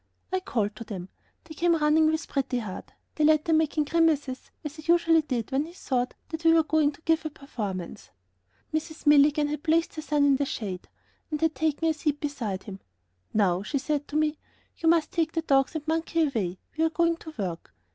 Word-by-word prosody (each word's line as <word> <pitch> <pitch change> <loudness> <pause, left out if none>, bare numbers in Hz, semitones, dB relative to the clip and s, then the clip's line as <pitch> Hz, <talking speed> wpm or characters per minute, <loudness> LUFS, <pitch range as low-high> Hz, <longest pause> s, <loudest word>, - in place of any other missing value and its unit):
I 375 - +2
called 215 - -2
to 230 - -6
them; 190 -4 -7 0.3
they 325 - -11
came 340 +2 +2
running 310 0 +4
up 315 - +2
with 315 - -2
Pretty 270 -2 -1
Heart; 215 -6 -6 0.2
the 305 - +2
latter 310 +1 +4
making 315 -1 +2
grimaces 295 -4 +1
as 300 0 -6
he 310 +2 0
usually 330 -1 +4
did 255 -5 -3
when 275 +3 +1
he 335 - -11
thought 255 -8 -2
that 325 0 -5
we 325 0 +6
were 325 -1 +5
going 310 -1 +2
to 285 - -18
give 325 0 +2
a 310 - -3
performance. 210 - -6 0.6
Mrs. 315 +1 -4
Milligan 295 0 +5
had 300 -1 -3
placed 325 +1 +1
her - - -2
son 295 -2 +2
in 280 -1 +5
the 285 - 0
shade 195 -8 -5 0.4
and 305 -2 -2
had 320 0 +2
taken 315 +3 0
a 320 - +3
seat 300 -1 -1
beside 240 -11 -3
him. 195 -2 -8 0.5
"Now," 190 -4 +2
she 245 +8 -2
said 290 +1 -2
to 295 - -8
me, 305 0 +1 0.4
"you 325 - +2
must 330 -1 +3
take 325 -1 0
the 325 - -1
dogs 275 +1 +2
and 305 -2 -4
the 315 - 0
monkey 330 0 +1
away; 205 -10 -2 0.2
we 320 - +1
are 325 - +3
going 335 +1 +1
to 315 -2 -11
work." 180 -5 -4
300 Hz, 215 wpm, -27 LUFS, 265-320 Hz, 0.6 s, we